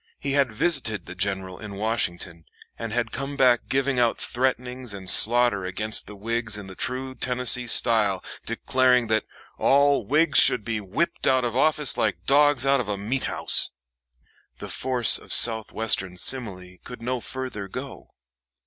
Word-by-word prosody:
He 140 - -4
had 135 -3 +1
visited 110 - 0
the 90 - -9
General 95 -1 -4
in 105 -2 -9
Washington, 90 -6 -3 0.3
and 115 -1 -7
had 115 -1 -2
come 135 +1 -5
back 125 -2 +2
giving 135 -1 0
out 120 -1 0
threatenings 125 -2 -3
and 95 -2 -10
slaughter 120 -1 +5
against 105 +4 -1
the 105 - -11
Whigs 115 +1 -2
in 105 - -9
the 95 - -10
true 130 +6 -4
Tennessee 125 -1 +2
style, 105 -5 +3 0.2
declaring 125 0 0
that 110 -1 0 0.3
"all 140 -2 +2
Whigs 145 +5 +2
should 115 - +4
be 110 -2 -3
whipped 105 - -3
out 130 -1 +2
of 120 -1 -4
office 150 -1 +2
like 110 -3 -2
dogs 145 -2 +3
out 135 0 +2
of 120 - -4
a 105 -1 -3
meat 115 +7 -3
house"; - - +3 0.9
the - - -9
force 125 -4 +2
of - - -11
south 110 -2 +1
western 95 -5 -2
simile 95 -6 -1
could 125 -2 -11
no 125 +1 -3
further 125 -5 -6
go. 130 +7 -9
120 Hz, 165 wpm, -23 LUFS, 105-130 Hz, 0.9 s, slaughter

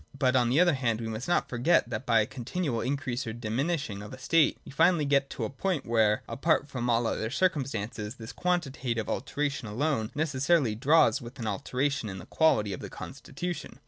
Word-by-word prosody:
But, 130 -2 +2
on 120 -2 +3
the 135 +6 +3
other 175 -1 +5
hand, 120 -5 0
we 115 - -4
must 110 +3 -5
not 175 - +2
forget, 125 +4 +2
that 115 +3 -4
by 115 -2 +5
the - - -6
continual 130 0 -3
increase 130 -1 -2
or 110 - -3
diminishing 120 0 -2
of 105 - -9
a 130 - -8
state, 150 +4 +3
we - - -10
finally 165 +2 +3
get 140 -1 +2
to - - -5
a - - -1
point 155 +1 -2
where, 110 -2 +2
apart 145 +4 +1
from 125 -4 -3
all 115 0 +2
other 110 0 -1
circumstances, 120 - -1
this 110 -1 -9
quantitative 135 -10 -1
alteration 140 -5 -2
alone 115 0 -1
necessarily 145 -3 +2
draws 145 +7 +4
with 120 0 -9
it - - -8
an - - -3
alteration 130 +4 -1
in 95 - -6
the 90 - -9
quality 105 -9 +2
of - - -6
the - - -7
constitution. 140 +5 -6
130 Hz, 205 wpm, -28 LUFS, 115-150 Hz, -, other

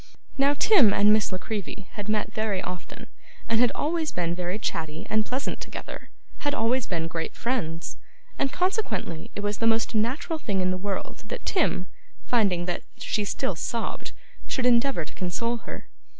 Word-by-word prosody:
Now, 280 +1 +4
Tim 280 - +6
and 205 +1 +6
Miss 215 -1 +3
La 185 - -1
Creevy 205 0 -5
had 205 0 -5
met 210 0 0
very 215 -3 0
often, 180 0 -6 0.4
and 225 - +3
had 245 0 +5
always 315 0 0
been 170 -1 0
very 180 +2 -2
chatty 160 -7 -3
and 215 0 +2
pleasant 260 +3 -2
together - - -7 0.3
had 290 -1 0
always 235 +2 +2
been 165 -3 -1
great 165 0 -3
friends 170 -10 -2 0.4
and 275 - +2
consequently 360 - -1
it - - -2
was 205 0 -1
the 225 - +3
most 225 0 +3
natural 255 +9 0
thing 200 -9 0
in 185 0 +2
the - - 0
world 195 +1 -4
that - - -5
Tim, 315 - +2 0.4
finding 195 -8 +3
that 175 -1 -1 0.2
she 210 - 0
still 195 -2 -1
sobbed, 230 +7 -3 0.4
should 255 - 0
endeavour 245 - +4
to - - -11
console 230 +7 -1
her. - - -8
215 Hz, 175 wpm, -27 LUFS, 185-250 Hz, 0.4 s, Tim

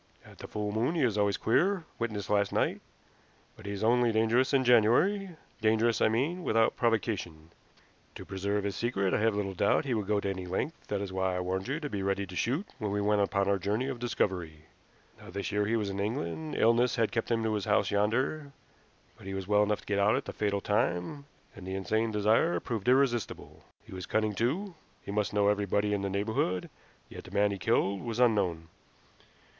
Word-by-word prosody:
At - - -16
the - - -8
full 105 -1 -3
moon 115 +10 0
he 160 - +1
is 115 -5 +2
always 100 -1 +1
queer 180 - +1
witness 110 -3 -3
last 100 -1 +1
night; - - 0 0.7
but 110 - -12
he - - -3
is 100 +1 -4
only 120 +1 +3
dangerous 115 +4 +2
in 135 -2 +3
January 125 - +4 0.3
dangerous, 110 +1 +2
I - - +5
mean, 140 +11 0
without 115 -5 +2
provocation. 100 -9 -1 0.6
To 95 - -9
preserve 100 +2 -2
his 100 -1 -2
secret, 100 -5 0
I - - +2
have 110 -1 +2
little 100 -2 -2
doubt 100 - +2
he 130 - -1
would 105 -4 -2
go 105 -1 +2
to 100 - -3
any 95 -2 -4
length; 95 - -4
that 100 -1 -2
is 95 -2 -5
why 95 -1 0
I - - -1
warned 95 +1 -2
you 140 +5 -2
to 150 - -4
be 100 -8 -4
ready 100 +1 -1
to 90 -1 -10
shoot 140 - 0
when 105 - -2
we 100 +1 -1
went 105 0 +2
upon 100 -1 +1
our 100 0 +2
journey 105 +8 -1
of 130 -3 -5
discovery. 90 -10 -2 0.6
Now - - -12
this 100 +3 -4
year 105 0 0
he 115 - +1
was 105 -3 -1
in 95 - -5
England; 110 - -3
illness 115 +2 +3
had 115 -2 +1
kept 115 - -2
him 115 -1 +1
to 110 -1 0
his 105 -2 -2
house - - +2
yonder, 130 +8 0 0.7
but - - -12
he 95 - -4
was 95 -1 -5
well 105 0 +4
enough 105 0 +1
to - - -20
get 100 -1 0
out 100 +2 +4
at - - -2
the - - -6
fatal 100 -1 -1
time, 105 - -1 0.3
and 95 -2 -10
the 95 - -3
insane 110 +4 0
desire 105 -4 +2
proved 110 +2 -4
irresistible. 125 -4 0 0.2
He - - -13
was 95 -1 -6
cunning 110 -1 0
too. 160 - -1 0.3
He - - -6
must 105 -1 0
know 100 0 +2
everybody 105 0 +1
in 100 - 0
the 100 - -2
neighborhood, 100 -2 -1 0.4
yet - - -10
the - - -10
man 100 +1 +2
he 100 - -4
killed 100 -3 +1
was 115 -1 -4
unknown. 95 -9 +2
105 Hz, 215 wpm, -30 LUFS, 100-115 Hz, 0.7 s, I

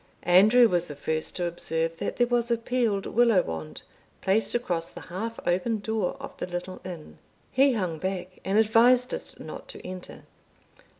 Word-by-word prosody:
Andrew 215 +7 +6
was 175 -4 0
the 145 - -7
first 155 +2 -2
to 175 - -1
observe 165 -1 -2
that - - -3
there 245 - +3
was 240 -1 0
a 235 - +2
peeled 230 -4 0
willow 230 -5 +4
wand 80 -1 -6 0.4
placed 205 +5 +1
across 175 -9 -1
the - - -11
half 225 +6 -5
open 185 +6 +1
door 215 -2 -2
of - - -8
the - - -4
little 180 +1 -6
inn. 175 -4 -9 0.3
He 270 +1 +4
hung 180 -8 -2
back 185 0 -4
and 195 +2 +1
advised 240 +3 +4
us - - -6
not - - -8
to - - -10
enter. 185 0 -8
190 Hz, 175 wpm, -27 LUFS, 175-230 Hz, 0.4 s, Andrew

